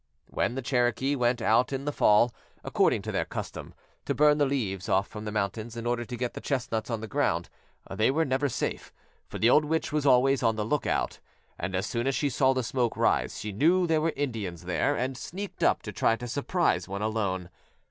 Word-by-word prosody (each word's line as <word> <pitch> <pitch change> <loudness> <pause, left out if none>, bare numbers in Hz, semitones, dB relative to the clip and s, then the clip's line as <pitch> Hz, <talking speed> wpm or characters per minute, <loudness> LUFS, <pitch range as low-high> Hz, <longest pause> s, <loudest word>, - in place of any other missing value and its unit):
When 120 - 0
the 135 - -4
Cherokee 125 +2 +1
went 120 -2 +1
out 120 +5 +3
in 135 0 -3
the 145 - 0
fall, 115 -2 +4 0.3
according - - +2
to - - -4
their - - 0
custom, - - -7 0.3
to - - -1
burn 150 0 +4
the 145 - +3
leaves 100 -9 -2
off 95 +1 +2
from 105 0 -8
the 105 - -3
mountains 110 +3 -3
in 115 - -5
order 120 0 -1
to 120 +1 -6
get 125 0 -2
the - - -7
chestnuts 120 -5 -2
on 115 -2 -2
the 110 - -5
ground, - - 0 0.4
they 110 - +1
were 160 +4 +2
never 135 +2 0
safe, - - -3 0.4
for - - -7
the 115 +2 +4
old 155 - +5
witch 160 +1 -1
was 150 -1 0
always 135 +1 +4
on 115 -2 +2
the 105 -1 -2
lookout, 150 +6 -1 0.4
and 95 +1 -3
as 95 - 0
soon 120 +2 -2
as 135 - +1
she 145 -2 0
saw 130 +2 +3
the 130 -1 0
smoke 120 0 -1
rise - - +1
she 105 - -4
knew 170 - +3
there 160 -2 +2
were 165 +1 0
Indians 105 - -3
there 90 +10 +1
and 130 +1 -2
sneaked 195 +9 -7
up - - +2
to - - -5
try 115 - +2
to 120 +2 -7
surprise 155 +8 0
one 100 +2 -4
alone. 100 -5 -2
120 Hz, 220 wpm, -28 LUFS, 110-140 Hz, 0.4 s, old